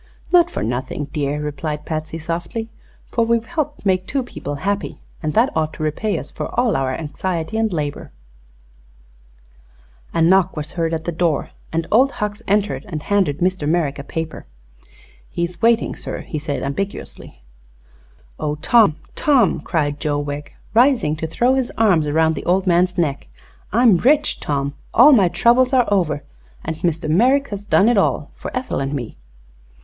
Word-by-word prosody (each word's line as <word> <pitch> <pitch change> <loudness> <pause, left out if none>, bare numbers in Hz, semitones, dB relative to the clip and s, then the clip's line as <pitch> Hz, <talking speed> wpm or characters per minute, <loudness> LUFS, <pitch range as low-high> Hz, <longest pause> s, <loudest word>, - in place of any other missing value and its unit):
"Not 350 -1 +5
for - - -4
nothing, 130 +5 -3
dear," 145 0 -1
replied 150 +1 -4
Patsy, 155 0 -4
softly, 170 +8 -4 0.4
"for 230 - +2
we've 230 0 +1
helped 295 -2 -3
make 185 -1 +1
two 270 -1 -1
people 145 -10 -6
happy, 200 +8 -3 0.2
and 155 -2 -2
that 235 +4 +3
ought 155 -1 0
to 155 - -6
repay 175 +8 -1
us - - -7
for - - -4
all 245 -3 +2
our 135 -1 0
anxiety 165 +4 -3
and 220 -1 +1
labor." 150 -4 -3 2.0
A - - -1
knock 180 +1 +4
was 150 0 -4
heard 165 -1 -1
at 160 0 -6
the 175 - -1
door, 165 -2 0 0.2
and 165 0 -1
Old 260 +5 +4
Hucks 210 0 -3
entered 205 +1 +1
and 155 -6 -5
handed 190 -8 +1
Mr. 180 -4 0
Merrick 155 -4 0
a - - -5
paper. 160 +2 -5 0.8
"He's 170 +2 -4
waiting, 230 0 +3
sir," - - -6
said 145 -2 -3
he, - - -3
ambiguously. 140 - -5 1.0
"Oh, 150 0 -1
Tom 200 +2 +4 0.2
Tom!" 270 - +3
cried 145 -3 -1
Joe 145 -1 -1
Wegg, 145 0 -5 0.2
rising 235 - +4
to 160 - -3
throw 240 +10 +2
his 265 -2 0
arms 185 -9 +3
around 160 +2 +2
the 150 - -6
old 185 +2 +2
man's 180 0 +2
neck, 150 -5 -1 0.4
"I'm 225 -2 +5
rich, 290 - +2
Tom 140 -1 -2 0.2
all 300 - +8
my 205 -9 +6
troubles 240 +9 +3
are 250 -2 +5
over 160 -7 +1 0.4
and 160 0 -3
Mr. 165 -1 -1
Merrick 255 - +3
has 205 -1 -6
done 205 0 +4
it 235 -3 +4
all 150 -6 0
for - - -7
Ethel 255 - -3
and 135 +1 -2
me!" 120 -5 -5
170 Hz, 170 wpm, -20 LUFS, 150-220 Hz, 2.0 s, all